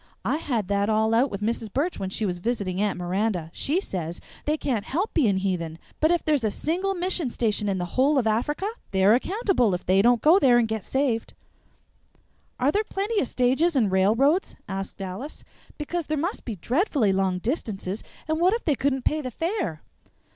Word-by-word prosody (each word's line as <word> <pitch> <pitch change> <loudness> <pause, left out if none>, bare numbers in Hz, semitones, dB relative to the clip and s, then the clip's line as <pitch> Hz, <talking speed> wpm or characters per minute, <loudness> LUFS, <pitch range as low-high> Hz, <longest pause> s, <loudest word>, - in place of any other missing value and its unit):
"I - - +1
had 235 - -2
that 200 +1 +1
all 220 +1 +2
out 250 +5 +3
with 200 -2 -6
Mrs. 225 -1 -2
Burch 300 - -1
when 190 - -3
she 215 +3 -2
was 180 -2 -2
visiting 200 -3 -2
Aunt 205 -3 0
Miranda. 180 -1 -1
She 310 +6 0
says 175 - -4 0.3
they 300 +1 +1
can't 245 -9 -1
help 355 - -2
being 220 - +3
heathen, 175 -4 -2 0.2
but 315 - +3
if 345 -1 +1
there's 295 -5 +2
a 215 - +2
single 365 - -1
mission 355 -5 0
station 210 -3 0
in 195 - 0
the 180 - -2
whole 270 - +2
of 250 - +2
Africa, 240 - 0 0.2
they're 190 +2 +4
accountable 265 - +1
if 180 - -7
they 190 +2 +4
don't 240 +2 +4
go 325 - +6
there 250 -6 +5
and 235 -2 +3
get 220 -2 -3
saved." 265 -4 -1 1.2
"Are 260 +3 +3
there 420 +5 +1
plenty 410 +1 -1
of 265 - -1
stages 265 +8 +2
and 220 -7 +2
railroads?" 230 - +2
asked 195 0 -5
Alice; 195 +11 -7 0.3
"because 325 +2 -3
there 310 - -1
must 345 +8 -3
be 230 - -4
dreadfully 245 - +1
long 190 -1 +1
distances, 205 - -3 0.2
and 315 0 0
what 365 +3 +4
if 470 - -6
they 305 - +3
couldn't 270 -1 -1
pay 310 0 +1
the 255 - -4
fare?" 325 - -3
240 Hz, 200 wpm, -25 LUFS, 195-310 Hz, 1.2 s, go